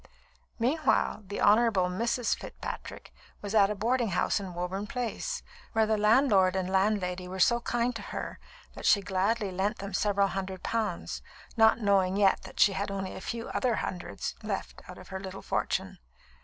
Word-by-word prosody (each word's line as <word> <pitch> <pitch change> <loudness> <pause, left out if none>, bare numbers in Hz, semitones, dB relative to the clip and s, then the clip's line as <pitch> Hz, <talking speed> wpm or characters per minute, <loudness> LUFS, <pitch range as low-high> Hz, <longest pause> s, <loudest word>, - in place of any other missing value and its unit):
Meanwhile, 250 -4 +1
the 205 - -4
Honourable 215 -2 +4
Mrs. 230 +7 0
Fitzpatrick - - -8 0.3
was 205 0 -4
at 200 -2 +5
a 210 - -1
boarding 235 +4 +1
house 185 +2 +1
in 190 -3 -7
Woburn 185 +4 -3
Place, 250 - -3 0.3
where 220 0 +3
the 220 0 +2
landlord 210 -3 +4
and 190 -1 -1
landlady 190 -2 +1
were 190 +1 -6
so 235 +5 +4
kind 240 0 -1
to 220 - -5
her - - -6 0.3
that - - -4
she 200 - +5
gladly 200 +2 0
lent 190 +3 -1
them 200 0 -7
several 200 0 +2
hundred 190 0 -5
pounds, 215 -6 -2 0.3
not 220 -1 +6
knowing 195 -2 +3
yet 200 -2 +4
that - - -11
she 200 - +6
had 200 +1 -2
only 195 -1 -4
a - - -7
few 230 +3 -5
other 245 -3 +1
hundreds 180 -4 -4
left - - -4
out - - -9
of - - -13
her 190 -1 -5
little 190 0 -8
fortune. - - -2
200 Hz, 175 wpm, -29 LUFS, 190-225 Hz, 0.3 s, not